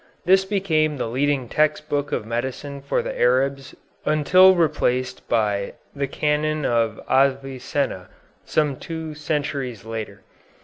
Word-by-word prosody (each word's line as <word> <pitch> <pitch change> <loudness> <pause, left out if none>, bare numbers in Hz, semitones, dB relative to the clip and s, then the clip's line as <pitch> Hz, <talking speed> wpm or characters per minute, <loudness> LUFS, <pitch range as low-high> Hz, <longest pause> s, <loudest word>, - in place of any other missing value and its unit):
This 190 +2 +5
became 160 -7 +1
the - - -2
leading 135 +1 0
text 150 +3 +1
book 145 -1 -1
of - - -2
medicine 130 +4 -4
for 140 - -1
the - - -4
Arabs 135 +2 +1 0.3
until 185 +5 +5
replaced 130 -6 0
by 105 -3 0 0.2
the 140 -1 -1
"Canon 150 +1 0
of 115 -2 +1
Avicenna" 135 -5 0 0.3
some 150 -4 0
two 160 -1 -6
centuries 145 -6 -3
later. 110 -3 -6
140 Hz, 125 wpm, -23 LUFS, 125-155 Hz, 0.3 s, This